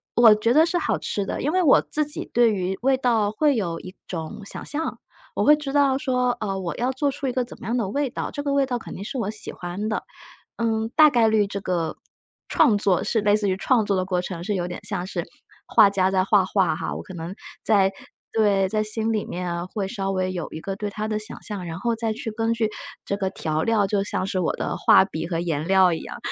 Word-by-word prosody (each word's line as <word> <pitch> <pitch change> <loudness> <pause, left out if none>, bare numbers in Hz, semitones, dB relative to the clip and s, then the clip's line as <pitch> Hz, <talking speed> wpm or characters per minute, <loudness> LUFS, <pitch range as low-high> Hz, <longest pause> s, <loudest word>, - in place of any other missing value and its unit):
我 230 -3 +7
觉 230 +3 +1
得 315 +4 +5
是 350 +1 0
好 - - 0
吃 200 - -2
的， - - -4
因 300 +4 0
为 370 0 +2
我 285 - +6
自 305 0 -1
己 295 - -2
对 235 -2 +5
于 190 -1 -2
味 265 0 +3
道 230 -5 +1
会 285 +4 +2
有 170 -6 -2
一 185 0 -10
种 165 +4 -6
想 - - -7
象， 310 +3 -3 0.4
我 - - 0
会 300 0 +7
知 285 -2 -5
道 280 -2 +3
说 250 -2 +1
呃， 195 -3 -2
我 180 -3 -4
要 250 +2 0
做 280 +2 0
出 280 0 -4
一 255 - 0
个 255 -1 0
怎 - - -12
么 - - -8
样 235 - 0
的 225 -6 -1
味 275 +4 -1
道， - - -4
这 285 - -5
个 285 -1 -1
味 280 -1 +2
道 245 -2 -2
肯 - - -9
定 195 - -7
是 265 +4 -5
我 210 -3 -1
喜 215 - -2
欢 180 +4 -5
的。 220 - -2 0.5
嗯， 225 -1 -1
大 305 -1 +8
概 230 -3 +4
率 215 -2 +3
这 200 0 -5
个 170 -4 -2 0.5
创 215 - +4
作 195 -4 +2
是 225 - +1
类 205 0 +3
似 205 -2 +1
于 185 - +1
创 230 +1 +2
作 200 -1 0
的 185 - 0
过 180 -1 0
程， 175 -2 -6
是 205 +1 -1
有 175 -2 -1
点 175 - -6
像 180 - -3
是 - - -3 0.4
画 200 - +6
家 190 -1 +2
在 185 -1 +2
画 195 -2 +4
画 185 -4 +1
哈， - - -4
我 - - -6
可 195 - -11
能 170 +3 -6 0.3
在 195 -3 +3 0.4
对， 200 -3 +3
在 215 +1 0
心 220 +1 +1
里 210 - -1
面 175 0 -4
会 195 -1 -3
稍 195 -2 -3
微 185 -1 -1
有 175 -2 -4
一 160 - -6
个 195 +2 -4
对 205 0 -4
它 215 +1 -4
的 215 -1 -1
想 215 +2 -8
象， 200 -4 -5
然 165 0 -5
后 235 0 -1
再 225 -1 -1
去 225 0 -5
根 225 +1 -1
据 225 -2 0 0.3
这 200 - -2
个 190 -2 -1
调 155 0 -2
料， 220 -3 +2
就 200 0 0
像 185 - -2
是 195 -1 -2
我 170 - 0
的 - - -3
画 190 - +5
笔 160 -4 -5
和 165 -1 -2
颜 160 -2 -2
料 190 -1 +5
一 - - -5
样， - - -8
210 Hz, 275 characters per minute, -24 LUFS, 185-240 Hz, 0.5 s, 大